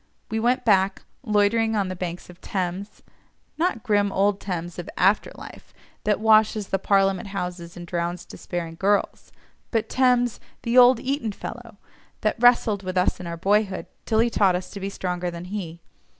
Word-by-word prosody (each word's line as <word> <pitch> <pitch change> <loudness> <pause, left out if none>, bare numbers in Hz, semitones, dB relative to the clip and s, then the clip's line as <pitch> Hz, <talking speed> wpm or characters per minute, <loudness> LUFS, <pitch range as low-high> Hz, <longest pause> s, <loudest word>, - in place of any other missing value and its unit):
We 220 - 0
went 245 +3 +1
back, 195 -3 +2 0.2
loitering 220 0 +2
on 200 -2 0
the 185 - -4
banks 175 -1 -5
of 180 0 -15
Thames—not 200 - -5
grim 205 -3 +2
old 200 +1 +1
Thames 175 -2 -5
of 175 - -6
"after 195 +3 +3
life," - - -12 0.3
that 210 -1 +2
washes 215 -1 +3
the 195 - 0
Parliament 195 +1 +2
Houses, 180 -3 -5
and 175 - -7
drowns 175 0 -3
despairing 165 -2 -6
girls—but 205 +2 -2
Thames, 250 -2 +2 0.2
the 235 +1 -1
"old 250 -1 +7
Eton 255 -4 -2
fellow," 230 0 -9 0.4
that 215 - 0
wrestled 235 -4 +4
with 185 -1 -4
us 180 - +1
in 180 - -7
our 170 0 -5
boyhood 195 +1 +1 0.2
till 220 - +1
he 230 +1 +3
taught 195 -5 +3
us 180 0 -5
to 200 - -7
be 195 0 -3
stronger 180 -2 -3
than 170 0 -7
he. 180 -4 -6
200 Hz, 165 wpm, -24 LUFS, 180-220 Hz, 0.4 s, old